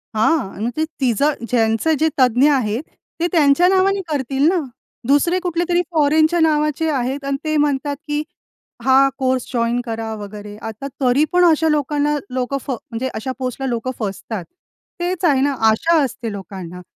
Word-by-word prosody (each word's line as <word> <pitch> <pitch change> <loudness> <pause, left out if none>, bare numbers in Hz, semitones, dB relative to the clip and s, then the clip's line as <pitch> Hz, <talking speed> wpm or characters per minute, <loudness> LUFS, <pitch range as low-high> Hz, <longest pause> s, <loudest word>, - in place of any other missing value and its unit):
हां. 220 -3 +1
मग 235 - 0
ते 315 - +2 0.2
तिचं 265 +4 +2 0.2
ज्यांचं 225 +6 +2
जे 320 - +3
तज्ञ 255 +2 +4
आहेत 240 -2 0 0.4
ते 340 - +1
त्यांच्या 315 +1 +4
नावाने 385 +1 +3
करतील 275 -1 0
ना, 370 - +1 0.5
दुसरे 290 +6 +3
कुठलेतरी 350 0 0
फॉरेनच्या 315 +2 +3
नावाचे 305 0 +1
आहेत 270 0 -2
आणि 275 0 -1
ते 310 0 -1
म्हणतात, 290 -1 0
की 295 0 -1 0.6
हा, 265 +1 +6
कोर्स 260 -1 0
जॉइन 235 0 +1
करा 225 -1 -4
वगैरे. 205 0 -8
आता 225 +5 -6
तरी 260 +3 +3
पण 360 0 +5
अशा 320 -1 +3
लोकांना, 295 0 +1
लोकं 255 +2 -2
फ - - -5
म्हणजे 235 0 -4
अशा 225 +4 -3
पोस्टला 260 +1 -3
लोकं 240 +1 -2
फसतात. 205 -1 -4 0.6
तेच 355 0 -1
आहे 280 -5 +3
ना, 285 +1 +2 0.2
आशा 325 +10 +2
असते 235 -3 -4
लोकांना, 185 -2 -8
275 Hz, 160 wpm, -19 LUFS, 235-310 Hz, 0.6 s, हा